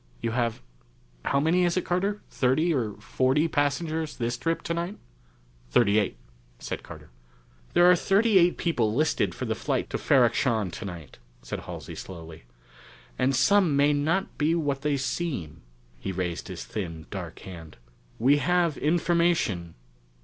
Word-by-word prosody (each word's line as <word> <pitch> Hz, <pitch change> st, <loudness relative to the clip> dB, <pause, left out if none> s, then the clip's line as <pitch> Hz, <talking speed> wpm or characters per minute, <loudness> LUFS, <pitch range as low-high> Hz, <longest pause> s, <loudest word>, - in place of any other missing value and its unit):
You 115 Hz, -, -2 dB
have 115 Hz, -, -1 dB, 0.6 s
how 140 Hz, -, +2 dB
many 165 Hz, +5 st, +3 dB
is 175 Hz, 0 st, +1 dB
it, 185 Hz, -, 0 dB
Carter? 195 Hz, +4 st, -1 dB
thirty 150 Hz, +7 st, +2 dB
or 115 Hz, -7 st, -1 dB
forty 130 Hz, +8 st, +1 dB
passengers 155 Hz, +1 st, -1 dB
this 120 Hz, 0 st, -1 dB
trip 165 Hz, +6 st, -2 dB
tonight?" 170 Hz, +4 st, -3 dB, 0.7 s
"Thirty 105 Hz, -, +4 dB
eight," 95 Hz, -, -2 dB, 0.4 s
said -, -, -5 dB
Carter. -, -, -12 dB, 0.6 s
"There 175 Hz, -, +6 dB
are 180 Hz, 0 st, +8 dB
thirty 200 Hz, +3 st, +4 dB
eight 175 Hz, 0 st, +3 dB
people 115 Hz, -11 st, 0 dB
listed 155 Hz, +2 st, +1 dB
for -, -, -4 dB
the -, -, 0 dB
flight -, -, -2 dB
to -, -, -2 dB
Ferrok 125 Hz, -5 st, +4 dB
Shahn 110 Hz, -9 st, 0 dB
tonight," 85 Hz, -9 st, -8 dB, 0.3 s
Halsey -, -, -6 dB
said -, -, -7 dB
slowly. 80 Hz, -7 st, -10 dB, 0.7 s
"And 130 Hz, +1 st, +2 dB
some 170 Hz, +3 st, +4 dB
may 145 Hz, +1 st, +4 dB
not 160 Hz, +7 st, -1 dB
be 155 Hz, +3 st, +2 dB
what 145 Hz, -4 st, -1 dB
they 145 Hz, -1 st, +1 dB
seem." 135 Hz, -, -3 dB, 0.4 s
He 95 Hz, -, -4 dB
raised 90 Hz, -2 st, -3 dB
his -, -, -6 dB
thin 80 Hz, -, -5 dB
dark -, -, -6 dB
hand. 85 Hz, -4 st, -10 dB, 0.4 s
"We 135 Hz, +5 st, +4 dB
have 170 Hz, +2 st, +1 dB
information...." 170 Hz, -, +1 dB
140 Hz, 150 wpm, -27 LUFS, 110-170 Hz, 0.7 s, are